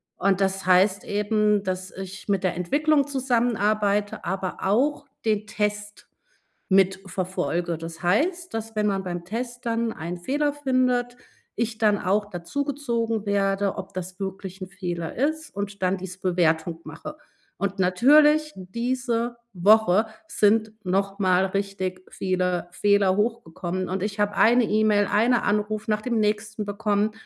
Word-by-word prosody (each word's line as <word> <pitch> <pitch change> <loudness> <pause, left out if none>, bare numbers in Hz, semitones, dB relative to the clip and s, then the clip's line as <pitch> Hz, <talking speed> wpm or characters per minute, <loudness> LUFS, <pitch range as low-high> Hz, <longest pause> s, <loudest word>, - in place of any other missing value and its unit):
Und 195 0 +1
das 190 -1 0
heißt 185 +2 +4
eben, 210 0 +1
dass 185 0 -3
ich 190 +1 -9
mit 195 -1 +1
der 180 - 0
Entwicklung 285 - +2
zusammenarbeite, 215 -6 0
aber 190 0 -3
auch 260 +10 +1 0.2
den 215 -1 +1
Test 210 0 -3 0.6
mit 190 0 +3
verfolge. 175 -2 -2
Das 165 +1 -8
heißt, 345 - +1
dass 225 0 -5
wenn 210 0 +1
man 195 -1 0
beim 175 -1 -5
Test 240 +4 -5
dann 230 0 0
einen 170 0 -5
Fehler 285 +10 0
findet, 255 -3 0 0.4
ich 225 0 -2
dann 210 -2 +3
auch 205 +2 0
dazugezogen 230 - -2
werde, 200 -1 +1
ob - - -7
das 185 +1 -6
wirklich 190 0 -6
'n 185 - -5
Fehler 175 -3 -5
ist 315 +5 -1
und 200 0 -5
dann 185 +1 +1
diese 185 0 -8
Bewertung 165 -2 +1
mache. 170 - -9 0.4
Und, 200 0 -2
natürlich, 295 +11 +5
diese 235 +4 -2 0.2
Woche 210 +2 +4 0.2
sind 215 -4 +2
noch 195 +2 -1
mal 185 0 +3
richtig 190 -1 -3
viele 180 -2 -1
Fehler 200 -1 +3
hochgekommen, 185 -5 -2
und 185 0 -2
ich 205 0 -3
habe 205 0 +1
eine 240 +2 +5
E-Mail, 210 -1 +3
eine 235 +3 +3
Anruf 210 +1 -1
nach 210 0 +1
dem 235 -1 -1
nächsten 210 0 -1
bekommen. 205 0 0
205 Hz, 145 wpm, -25 LUFS, 185-230 Hz, 0.6 s, natürlich